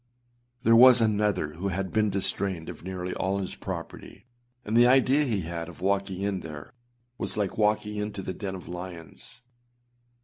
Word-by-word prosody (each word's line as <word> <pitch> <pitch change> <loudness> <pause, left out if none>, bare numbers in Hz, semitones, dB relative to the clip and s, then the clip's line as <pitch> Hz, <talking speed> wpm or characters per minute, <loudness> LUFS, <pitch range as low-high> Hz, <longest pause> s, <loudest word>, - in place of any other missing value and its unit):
There 115 -2 +6
was 125 +1 +9
another 105 -7 +1
who 90 +5 -4
had 95 0 -2
been 110 -1 +2
distrained 95 -3 -1
of - - -9
nearly 90 0 -4
all 95 +1 -1
his 95 -2 -4
property; 95 +5 -7 0.4
and 110 - -2
the 120 +1 +7
idea 135 +3 +4
he 110 -7 0
had 85 0 -5
of 85 - -13
walking 95 0 -1
in 100 -2 -1
there 75 -4 -9 0.5
was - - -2
like 100 -3 -1
walking 105 0 +1
into 105 -1 -4
the 95 - -4
den 95 0 -5
of 90 - -10
lions. 90 +5 -8
100 Hz, 170 wpm, -27 LUFS, 90-105 Hz, 0.5 s, was